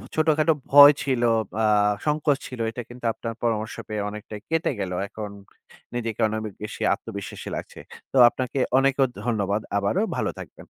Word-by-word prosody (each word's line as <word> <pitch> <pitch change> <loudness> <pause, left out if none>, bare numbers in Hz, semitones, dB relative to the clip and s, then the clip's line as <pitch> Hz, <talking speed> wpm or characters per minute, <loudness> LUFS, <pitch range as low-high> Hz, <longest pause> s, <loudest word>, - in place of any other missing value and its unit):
ছোটখাটো 155 0 +3 0.2
ভয় 145 +1 +11
ছিল 130 -3 0 0.4
আ - - +4 0.4
সংকোচ 150 -1 +1
ছিল 125 - -9
এটা 120 - -6
কিন্তু 120 0 -10
আপনার 115 0 -5
পরামর্শ 110 -2 -1
পেয়ে 105 -1 -3
অনেকটাই 105 0 -8
কেটে 165 0 +1
গেল। 95 -2 -3 0.2
এখন 105 +1 -7 0.7
নিজেকে 115 -3 -3
অনেক 110 0 -2
ব - - -2 0.2
বেশি 105 - -7
আত্মবিশ্বাসী 100 -3 -7
লাগছে। - - -8 0.3
তো - - +1
আপনাকে 130 +2 -3 0.2
অনেক 135 +1 +4
অ - - +5 0.2
ধন্যবাদ। 105 -3 0 0.2
আবারও 100 - +1
ভালো - - 0
থাকবেন। - - -11
120 Hz, 160 wpm, -24 LUFS, 105-140 Hz, 0.7 s, ভয়